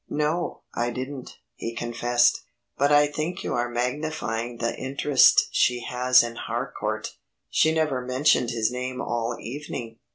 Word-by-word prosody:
"No, 155 +4 -1
I 120 +1 -1
didn't," 130 +2 -6 0.2
he 115 0 -6
confessed, 120 +1 +1 0.3
"but 140 +1 +2
I 145 0 +6
think 155 +4 -4
you - - -2
are 120 0 0
magnifying 120 -2 -3
the 115 0 -2
interest 135 +1 +4
she 125 -1 +2
has 125 +1 +4
in 120 0 -5
Harcourt. 115 -3 -4 0.3
She 160 - +4
never 155 -5 0
mentioned 130 0 +2
his 115 -1 0
name 125 0 -4
all 120 0 -2
evening." 120 -3 -7
125 Hz, 140 wpm, -25 LUFS, 120-145 Hz, 0.3 s, I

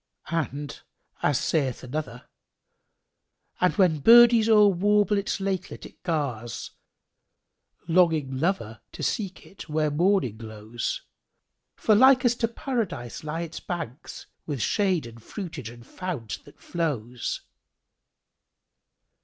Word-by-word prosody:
And 145 -3 -3 0.4
as 145 -3 +2
saith 135 -7 -1
another, 125 -2 -5 1.3
"And 180 - +2
when 180 -7 +3
birdies 230 - +7
o'er 210 -2 +7
warble 205 +2 +2
its 200 - -2
lakelet, 190 -2 -3
it - - -14
gars 140 - -3 0.6
* - - -43
Longing[FN#7] 160 -6 +2
lover 135 - -1
to - - -7
seek 195 -4 -2
it 195 - -12
where 155 0 +1
morning 170 - +2
glows; 110 +1 -5 0.7
For 215 - +2
likest 250 +1 +5
to 230 - +2
Paradise 225 - -4
lie 155 +2 -3
its 170 -1 -6
banks 165 -5 -6
* - - -50
With 145 -4 -3
shade 185 - +1
and 115 0 -11
fruitage 160 - -7
and 120 0 -13
fount 140 - -6
that 145 - -17
flows." 125 -8 -3
165 Hz, 120 wpm, -26 LUFS, 130-195 Hz, 1.3 s, birdies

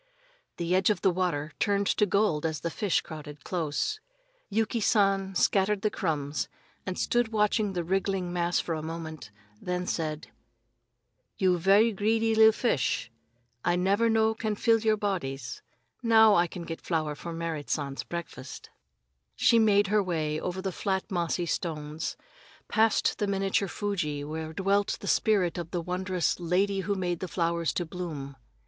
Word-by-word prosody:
The 170 +1 -1
edge 190 +2 +3
of 210 -3 0
the 190 - +5
water 170 -5 -1
turned 200 0 +1
to 210 - +2
gold 200 -6 +2
as 160 -2 -2
the 170 - -2
fish 200 +1 +1
crowded 150 -3 -9
close. 180 - -2 0.5
Yuki 220 +3 0
San 195 -3 +2
scattered 195 +1 +2
the 215 - +2
crumbs 150 -4 -2 0.4
and 185 - -3
stood 240 -1 +1
watching 210 -2 +1
the 175 -2 -1
wriggling 190 0 -1
mass 175 0 +1
for 165 - -2
a 155 - -3
moment, 160 -6 -6 0.3
then 180 0 -2
said: 155 -3 -3 1.1
"You 185 -2 +3
ve'y 200 +6 +5
greedy 225 +2 +2
li'l 220 0 +7
fish. 220 - 0 0.5
I 175 - +2
never 200 +6 +2
no 220 0 +3
can 220 -1 -2
fill 225 +2 +3
your 215 -1 +2
bodies. 140 -11 -3 0.4
Now 220 -2 +6
I 175 -3 +4
get 170 -1 -7
flower 155 -3 -1
for 170 +3 -7
Merrit 165 -5 -4
San's 140 0 -2
breakfast." 170 -6 -7 0.6
She 230 - +4
made 205 -2 +4
her 210 - +5
way 155 -5 -1
over 185 +1 -4
the 190 - -1
flat 190 +4 -2
mossy 175 -1 0
stones, 155 -2 -3 0.5
passed 220 0 +2
the 205 - 0
miniature 195 0 +1
Fuji 165 -9 -2
where 160 +1 -5
dwelt 195 +4 +1
the - - -9
spirit 190 -5 +2
of 170 -1 -5
the 175 - -2
wondrous 180 +1 -1
"Lady 190 +3 +1
who 200 +2 -1
made 175 -3 -2
the 185 - -4
flowers 170 -3 0
to 175 - -1
bloom." 155 -5 -6
180 Hz, 160 wpm, -28 LUFS, 165-205 Hz, 1.1 s, li'l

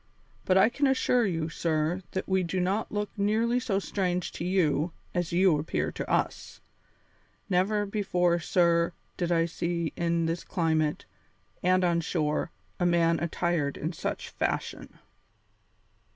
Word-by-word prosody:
But 185 - +4
I 190 +3 +7
can 280 +4 +1
assure 250 -3 +2
you, 165 -4 -1
sir, 165 +1 -1
that 190 - -3
we 190 -1 +2
do 180 +1 -2
not 190 +4 0
look 210 0 -2
nearly 225 +4 +1
so 220 -5 -1
strange 180 -3 -1
to - - -6
you 175 -3 +1 0.2
as 175 -2 -1
you 175 -3 +4
appear 150 - -2
to - - -6
us. - - -1 0.9
Never 205 +3 +2
before, 180 -4 +1
sir, 170 0 +2 0.2
did 175 -1 -2
I 165 -1 +3
see 170 -1 -2
in 170 -1 0
this 165 +1 -2
climate, 160 -4 0 0.6
and 185 +1 +3
on 170 -1 +2
shore, 150 0 -1 0.3
a 175 - +1
man 170 -1 +3
attired 170 -3 -1
in 160 +4 -3
such - - -4
fashion." - - -3
175 Hz, 145 wpm, -28 LUFS, 165-190 Hz, 0.9 s, I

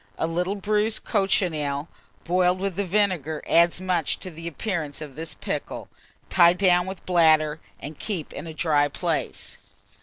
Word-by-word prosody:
A - - 0
little 180 +4 -1
bruised 210 +2 0
cochineal 160 -8 0 0.4
boiled 180 +1 +2
with 195 -2 -2
the 200 - 0
vinegar 180 -6 0
adds 170 +1 +4
much 180 -5 0
to 185 - -5
the 165 +1 -8
appearance 170 -4 -3
of 150 -4 -8
this 165 +1 -6
pickle. - - -5 0.4
Tie 175 -2 +6
down 180 -1 +3
with 190 0 -7
bladder, 160 -3 +4 0.2
and 150 +1 -8
keep 185 -8 -4
in 165 - -7
a 160 - -7
dry 150 -3 +2
place. 145 - -3
175 Hz, 155 wpm, -25 LUFS, 155-190 Hz, 0.4 s, Tie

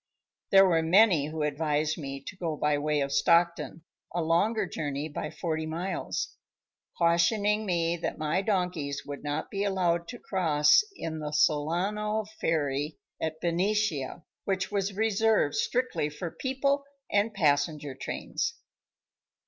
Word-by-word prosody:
There 195 0 +7
were 165 -3 +3
many 175 -3 +5
who 155 0 -3
advised 150 +1 0
me 140 -3 -6
to - - -7
go 165 -5 -3
by 150 0 +1
way 150 0 0
of 140 0 -1
Stockton, 170 +2 +2 0.3
a 175 - +1
longer 200 +7 +2
journey 145 -4 -3
by 155 0 -5
forty 160 -1 -3
miles, 175 +4 -3 0.6
cautioning 205 +6 +2
me 170 -1 +1
that 170 - -3
my 155 +4 0
donkeys 180 -9 -1
would 145 -1 -7
not 145 +1 -3
be 200 0 -1
allowed 175 -4 +1
to 240 - -7
cross 160 - +3
in 160 - -5
the 150 -1 -4
"Solano" 190 +9 +1
ferry 145 -1 -1 0.2
at 160 0 -2
Benicia, 175 -4 0 0.2
which 190 0 -1
was 200 -1 -1
reserved 220 -5 +2
strictly 240 -9 0
for 165 +3 -6
people 275 +2 0 0.3
and 205 +2 +2
passenger 145 -3 +1
trains. 300 - -3
170 Hz, 135 wpm, -28 LUFS, 150-195 Hz, 0.6 s, There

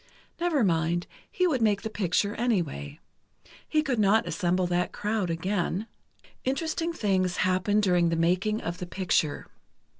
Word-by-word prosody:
Never 335 -7 +2
mind, 170 -1 +1 0.3
he 365 - +1
would 280 -9 +1
make 205 -2 +2
the 220 - -3
picture 200 +1 0
anyway. 170 - -2 0.7
He 305 0 +2
could 260 -6 -1
not 210 +2 +3
assemble 180 -1 0
that 175 0 0
crowd 210 -3 -1
again. 180 +3 -1 0.6
Interesting 320 +5 -1
things 190 - 0
happened 185 +3 +2
during 175 -3 +3
the 165 - 0
making 185 +6 +1
of 170 +2 -4
the 180 - -5
picture. 175 -5 0
195 Hz, 145 wpm, -27 LUFS, 175-220 Hz, 0.7 s, not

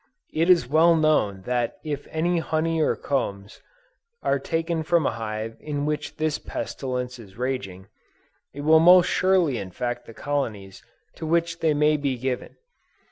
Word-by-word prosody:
It 165 +3 +1
is 170 -9 +5
well 160 +4 +5
known 150 -12 +2
that 120 +1 -1
if 145 -2 -4
any 170 +2 0
honey 160 0 0
or - - +2
combs 100 -8 -3 0.6
are 140 - +1
taken 165 +3 -2
from 160 0 +2
a - - +2
hive 110 0 -5
in 145 -1 -3
which 150 0 -3
this 155 -1 -1
pestilence 125 -1 -4
is 100 -4 -14
raging, 115 -8 -4 0.6
it 145 - -8
will 160 +2 +6
most 180 +2 +7
surely 180 -11 +2
infect 120 +6 -4
the 115 - -12
colonies 110 -10 -4 0.3
to 160 - -5
which 170 +1 0
they 155 -2 +2
may 150 +1 +3
be 140 -3 -1
given. 125 0 -4
145 Hz, 155 wpm, -24 LUFS, 120-160 Hz, 0.6 s, most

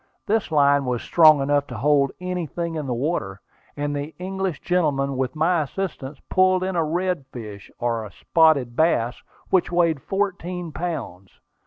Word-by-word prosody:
This 215 -4 0
line 140 -2 +4
was 125 -2 -2
strong 155 -4 +6
enough 145 0 +1
to 125 - -7
hold 140 +2 +3
anything 175 -2 -3
in 155 -3 -4
the 125 - -1
water, 120 - -2 0.4
and 145 0 -2
the 145 +2 -5
English 190 -2 -3
gentleman, 145 -6 0
with 130 +3 -2
my 165 +2 +2
assistance, 150 -3 -5
pulled 185 0 +3
in 190 0 -2
a 165 - +2
redfish, 135 - -4
or 115 -3 -2
spotted 135 - +2
bass, 125 -7 +1 0.3
which 185 -1 +2
weighed 170 -4 +2
fourteen 180 -3 -3
pounds. 145 - -6
155 Hz, 150 wpm, -23 LUFS, 135-180 Hz, 0.4 s, strong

